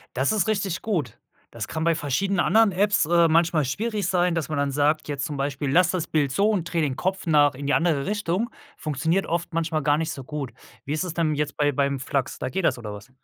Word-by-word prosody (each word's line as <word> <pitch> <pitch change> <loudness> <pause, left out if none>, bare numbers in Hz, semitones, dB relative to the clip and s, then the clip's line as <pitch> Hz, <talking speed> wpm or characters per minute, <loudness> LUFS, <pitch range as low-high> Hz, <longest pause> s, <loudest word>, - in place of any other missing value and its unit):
Das 130 +8 +1
ist 215 0 +1
richtig 195 -4 -1
gut. 160 - -2 0.3
Das 110 -2 -5
kann 160 - -3
bei 165 0 +3
verschiedenen 165 +7 -1
anderen 220 -2 +4
Apps, 205 +1 +2
äh, 170 +1 +4
manchmal 160 -2 +3
schwierig 210 - -2
sein, 180 -2 +2
dass 165 -3 -2
man 155 - -2
dann 140 -1 0
sagt, 150 +3 +1
jetzt 140 -1 -3
zum 150 - -4
Beispiel: 140 0 -2
„Lass 175 +2 +4
das 180 -4 -2
Bild 145 -4 +1
so 200 +7 +2
und 185 -6 -1
dreh 165 -2 +1
den 140 -4 0
Kopf 190 +1 -2
nach 145 -4 +4
in 140 +2 -7
die 140 - +1
andere 160 -5 +2
Richtung.“ 205 +1 -1 0.3
Funktioniert 160 +5 0
oft 170 +1 -3
manchmal 160 -1 0
gar 145 +1 +3
nicht 160 0 -2
so 135 -4 -7
gut. 140 -3 -5 0.3
Wie 145 - -2
ist 155 - -1
es 180 - -4
denn 165 -2 +1
jetzt 150 0 -2
bei 145 -1 +2
beim 140 0 0
Flux, 140 0 -2
da - - -3
geht 190 +4 -2
das - - +2
oder 105 -3 -7
was? 105 +5 -11
160 Hz, 245 wpm, -24 LUFS, 140-180 Hz, 0.3 s, anderen